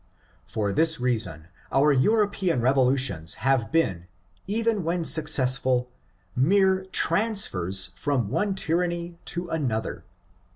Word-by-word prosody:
For 105 -3 -2
this 160 +6 +2
reason 110 -10 -2 0.2
our 145 +2 +4
European 200 - +1
revo 130 +1 +3
lutions 100 -13 0
have 130 -4 +1
been, 95 - 0 0.4
even 220 -1 0
when 170 +1 -1
successful, 130 -5 +1 0.4
mere 190 +7 +3
transfers 100 - 0
from 120 +3 -1
one 200 - -1
tyranny 170 -1 -2
to 175 0 -2
another. 125 -9 -3
140 Hz, 110 wpm, -25 LUFS, 120-175 Hz, 0.4 s, our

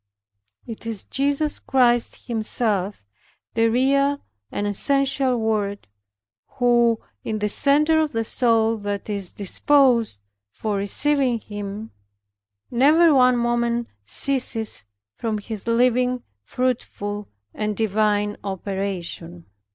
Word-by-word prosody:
It 230 0 -8
is 225 -3 -3
Jesus 285 +2 -1
Christ 240 -3 +1
Himself, 215 - -1 0.5
the 230 0 +3
real 275 +4 +2 0.3
and 205 - -2
essential 270 +4 +1
Word 210 -3 -1 0.7
who 240 -2 +3 0.2
in 220 - -2
the 210 0 0
center 300 +8 +4
of 310 -2 +1
the 225 -1 -1
soul 225 -1 +2
that 205 0 -4
is 200 -3 -3
disposed 235 - +2 0.3
for 210 - -3
receiving 255 +5 +1
Him, 205 +1 -7 0.8
never 300 +6 +5
one 255 -2 +5
moment 235 0 0
ceases 225 - -2 0.3
from 220 - -2
His 210 0 -6
living, 250 +1 +2 0.2
fruitful, 205 - -3 0.3
and 210 -1 -2
divine 210 -1 +1
operation. 190 -3 -4
230 Hz, 105 wpm, -23 LUFS, 205-255 Hz, 0.8 s, never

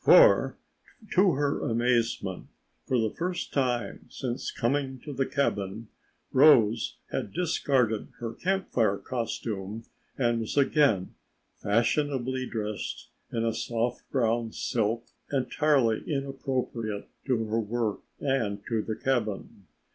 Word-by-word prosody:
For, - - +7 0.6
to 185 -1 +5
her 145 0 0
amazement, 115 -5 0 0.4
for 130 - +2
the 110 -2 +1
first 175 +1 -3
time 125 -4 -1
since 125 -2 -3
coming 130 +1 -1
to 145 - -7
the 135 0 0
cabin, 105 -6 -1 0.4
Rose 120 -6 +5
had 100 - -2
discarded 135 -10 +1
her 115 -1 -4
Camp 190 +1 -1
Fire 105 -4 +2
costume 110 -3 -4 0.3
and 120 -3 +2
was 115 +5 -4
again 135 - +3 0.5
fashionably 130 +3 +1
dressed 105 -2 -4 0.2
in 115 0 0
a 115 - +1
soft 120 +1 -2
brown 115 -3 +1
silk 115 +1 -1 0.3
entirely 135 -3 +2
inappropriate 130 -6 -2 0.2
to 120 -4 +1
her 110 +1 0
work 115 -1 -1 0.2
and 110 -8 -1
to 115 -2 0
the 110 0 -3
cabin. 110 -7 -2
120 Hz, 115 wpm, -28 LUFS, 110-135 Hz, 0.6 s, For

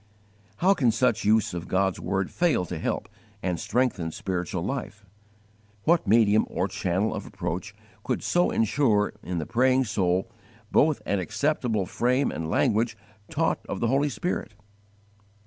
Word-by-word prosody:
How 190 +3 +4
can 135 -11 +2
such 115 -1 +1
use 110 -2 +3
of 85 +1 -5
God's 95 0 +1
word 95 +1 -2
fail 170 - +1
to 90 -2 -5
help - - -2 0.4
and 90 -3 -1
strengthen 115 -9 0
spiritual 90 0 -3
life? 105 -4 -5 0.8
What 165 -8 +3
medium 110 0 +4
or 90 - -1
channel 95 +1 -1
of - - -5
approach - - -5 0.3
could - - -2
so 175 0 +2
insure 110 -2 +2
in 90 -1 -4
the 80 - -2
praying 130 +3 +3
soul 95 -1 0 0.4
both 155 0 +3
an 100 - 0
acceptable 110 - 0
frame 125 +7 +1
and 80 0 -4
language 110 +7 +1 0.3
taught - - 0
of - - -3
the 115 - +1
Holy 140 +3 +2
Spirit? 115 - -3
110 Hz, 145 wpm, -26 LUFS, 95-130 Hz, 0.8 s, How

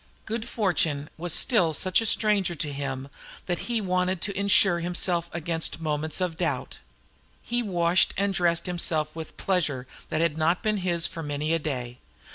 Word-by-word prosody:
Good 225 +1 -4
fortune 160 -8 0
was 175 +1 -2
still 175 - +4
such 185 +7 +3
a 225 - 0
stranger 205 -5 +2
to 150 -2 -3
him 135 -1 -4 0.4
that 175 -2 -2
he 235 -1 +1
wanted 185 -2 0
to 200 +1 -3
insure 200 -2 +4
himself 175 0 0
against 165 -1 -1
moments 155 0 -1
of 180 -3 -2
doubt. - - -2 0.6
He 240 0 -1
washed 175 -4 +2
and 200 0 +1
dressed 175 -2 +1
himself 160 -4 -1
with 160 -1 -8
pleasure 155 -9 0 0.2
that - - -1
had 160 -1 +1
not 165 +3 +2
been 215 -1 +1
his 175 -3 0
for 170 -2 -4
many 150 +1 -2
a 165 - +2
day. 125 -5 -4
170 Hz, 170 wpm, -26 LUFS, 155-190 Hz, 0.6 s, still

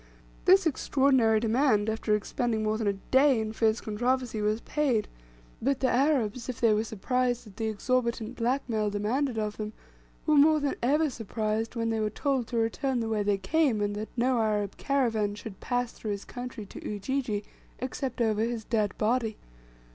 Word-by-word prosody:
This 380 0 +6
extraordinary 265 -6 +3
demand, 225 -1 +2
after 220 -1 +1
expending 220 +2 -1
more 215 0 +1
than 220 -1 -1
a 200 - +3
day 260 +6 +3
in 220 0 -3
fierce 220 0 +2
controversy, 240 +1 -1
was 210 +1 +1
paid; 260 -8 0 0.5
but 270 +2 +1
the 260 - +2
Arabs, 250 -3 +1
if 250 - -4
they 230 -2 +4
were 210 +1 +1
surprised 245 +3 -1
at 205 -3 -15
the 225 - -1
exorbitant 235 +1 -1
black 250 +4 0
mail 215 -3 0
demanded 225 +5 -1
of 210 -1 -2
them, 215 0 -4 0.5
were 310 - +3
more 305 +1 +6
than 285 -1 0
ever 295 +5 +2
surprised 225 0 -2
when 230 -1 0
they 225 - 0
were 215 -1 0
told 260 +1 -1
to 240 - -3
return 240 +3 0
the 225 -1 -2
way 215 -1 0
they 205 -1 +1
came; 255 - +1
and 205 0 -1
that 215 +1 -5
no 250 +1 +2
Arab 210 -2 0
caravan 225 -7 0
should 205 -2 -9
pass 245 -1 -1
through 215 - -7
his 200 - -6
country 245 -3 -7
to - - -10
Ujiji 210 0 -2 0.3
except 255 -1 -4
over 220 -2 +2
his 230 0 -1
dead 215 -3 -1
body. 225 0 0
230 Hz, 185 wpm, -28 LUFS, 215-255 Hz, 0.5 s, This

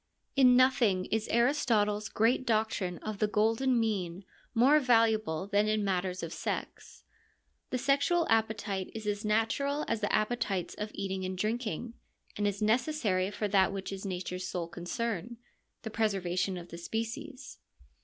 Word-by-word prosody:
In 255 -2 +6
nothing 240 -8 +3
is 220 0 0
Aristotle's 225 -5 +2
great 230 +4 +2
doctrine 215 -5 0
of 215 -2 -4
the 215 - +2
golden 225 +4 +2
mean 195 -5 -2 0.3
more 270 +6 +6
valuable 220 - +2
than 205 +1 +2
in 215 -1 +1
matters 185 -1 -1
of 165 0 -5
sex. - - -5 0.7
The 255 - -1
sexual 280 +6 +2
appetite 215 -3 0
is 220 -1 -6
as 205 0 -2
natural 225 +7 0
as 225 -1 -1
the 205 - 0
appetites 210 -5 0
of 210 0 -5
eating 190 -1 -3
and 185 0 -3
drinking; 225 +1 -2 0.4
and 205 0 0
as 205 +1 -2
necessary 215 -5 +1
for 210 +1 -2
that 190 -1 +4
which 195 0 -5
is 195 - -7
nature's 185 -1 -4
sole 175 -3 -3
concern, 210 +5 -4 0.5
the 220 - -5
preservation 195 -4 0
of 175 0 -9
the 170 - -8
species. 245 - -5
215 Hz, 150 wpm, -30 LUFS, 190-235 Hz, 0.7 s, In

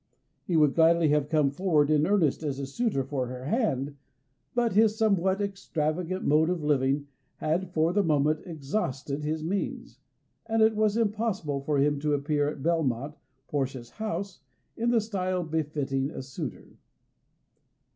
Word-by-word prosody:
He 175 - -1
would 150 -3 +4
gladly 165 -1 +4
have 150 0 +2
come 150 -4 +3
forward 155 -2 +2
in 150 0 +3
earnest 185 -9 +2
as 145 -4 -2
a 140 - -3
suitor 140 - -1
for 130 -1 -2
her 125 +1 -7
hand, 145 - -1 0.6
but 240 -3 +2
his 215 +1 +4
somewhat 195 -3 +2
extravagant 180 -2 -2
mode 155 +3 +4
of 180 -3 -2
living 140 -1 +1 0.3
had 170 +4 -1
for 165 0 +2
the 205 - +3
moment 155 -3 +2
exhausted 145 -3 -3
his 155 +1 -2
means, 190 +5 -3 0.5
and 225 0 +3
it 220 0 +4
was 215 0 +2
impossible 210 -10 -1
for 145 +1 0
him 145 +1 +2
to 150 0 +1
appear 145 +1 0
at 145 -2 -7
Belmont, 150 -5 0 0.3
Portia's 130 -4 -3
house, 210 -3 -4 0.4
in 235 +1 0
the 235 -2 +3
style 185 -4 -2
befitting 145 -4 -1
a 150 - -7
suitor. 130 0 -7
155 Hz, 155 wpm, -28 LUFS, 140-195 Hz, 0.6 s, would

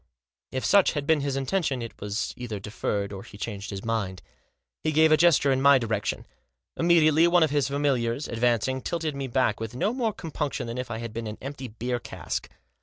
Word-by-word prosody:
If 130 - -2
suoh 200 -2 +5
had 145 -1 -2
been 155 -1 +3
his 140 -1 -1
intention, 135 -2 -1
it 115 - -9
was 105 +2 -2
either 115 -4 -5
deferred, 100 -1 -3
or 95 - -6
he 100 - -12
changed 105 -1 -5
his 100 0 -6
mind. 100 -5 -2 0.6
He 155 - +1
gave 160 +1 +5
a - - +8
gesture 155 -4 +4
in 130 0 +1
my 140 0 +7
direction. 110 -4 -2 0.5
Immediately 165 -1 +5
one 175 -1 +5
of 155 - +1
his 145 -3 +2
familiars, 140 -2 0
ad 115 - -5
vancing, 125 +2 +1
tilted 160 -3 -2
me 135 -1 -3
back 125 -3 +1
with 115 +1 -5
no 205 - 0
more 240 -4 0
compunction 150 - -4
than 115 +2 -5
if 125 -1 -4
I 115 - -3
had 115 -1 -6
been 115 -1 -4
an 105 - -6
empty 135 -1 -6
beer 120 +2 -3
cask. - - -5
130 Hz, 210 wpm, -26 LUFS, 115-150 Hz, 0.6 s, a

